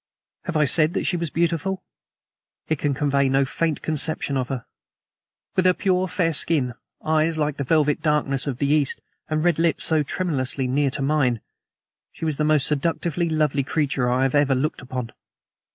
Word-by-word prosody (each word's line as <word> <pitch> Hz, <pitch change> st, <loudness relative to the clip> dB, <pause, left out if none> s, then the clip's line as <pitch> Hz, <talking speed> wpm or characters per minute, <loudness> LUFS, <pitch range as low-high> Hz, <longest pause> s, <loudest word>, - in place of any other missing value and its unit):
Have 170 Hz, -3 st, -1 dB
I 150 Hz, -, +4 dB
said 155 Hz, +4 st, +3 dB
that -, -, 0 dB
she 180 Hz, -, +1 dB
was 170 Hz, -2 st, -2 dB
beautiful? 170 Hz, +4 st, -1 dB, 0.8 s
It 155 Hz, -3 st, -1 dB
can 145 Hz, -2 st, 0 dB
convey 140 Hz, -1 st, +1 dB
no 135 Hz, +1 st, +3 dB
faint 160 Hz, +3 st, -2 dB
conception 155 Hz, -2 st, 0 dB
of 130 Hz, -2 st, -1 dB
her. 130 Hz, -4 st, -5 dB, 0.9 s
With 185 Hz, -, +2 dB
her 180 Hz, -1 st, +5 dB
pure, 185 Hz, -1 st, +1 dB
fair 175 Hz, -3 st, 0 dB
skin, 140 Hz, -5 st, +1 dB, 0.3 s
eyes 155 Hz, +1 st, +1 dB
like 150 Hz, -1 st, -1 dB
the 140 Hz, -, -2 dB
velvet 150 Hz, +1 st, +2 dB
darkness 145 Hz, -3 st, 0 dB
of 130 Hz, -4 st, -2 dB
the 140 Hz, -, 0 dB
East, 145 Hz, -1 st, +2 dB, 0.3 s
and 155 Hz, 0 st, 0 dB
red 175 Hz, -2 st, +2 dB
lips 165 Hz, -1 st, +2 dB
so 160 Hz, -2 st, +3 dB
tremulously 140 Hz, -5 st, -2 dB
near 140 Hz, +2 st, +1 dB
to 135 Hz, -, -3 dB
mine, 135 Hz, -5 st, +1 dB, 0.7 s
she -, -, -6 dB
was 155 Hz, -3 st, -1 dB
the 150 Hz, -, 0 dB
most 150 Hz, -2 st, +3 dB
seductively 165 Hz, +3 st, -1 dB
lovely 155 Hz, -3 st, +1 dB
creature 135 Hz, -3 st, 0 dB
I 130 Hz, +2 st, +2 dB
ever 135 Hz, +2 st, +2 dB
had 135 Hz, -2 st, +2 dB
looked 150 Hz, +4 st, -2 dB
upon. 125 Hz, -2 st, -5 dB
150 Hz, 185 wpm, -23 LUFS, 135-165 Hz, 0.9 s, her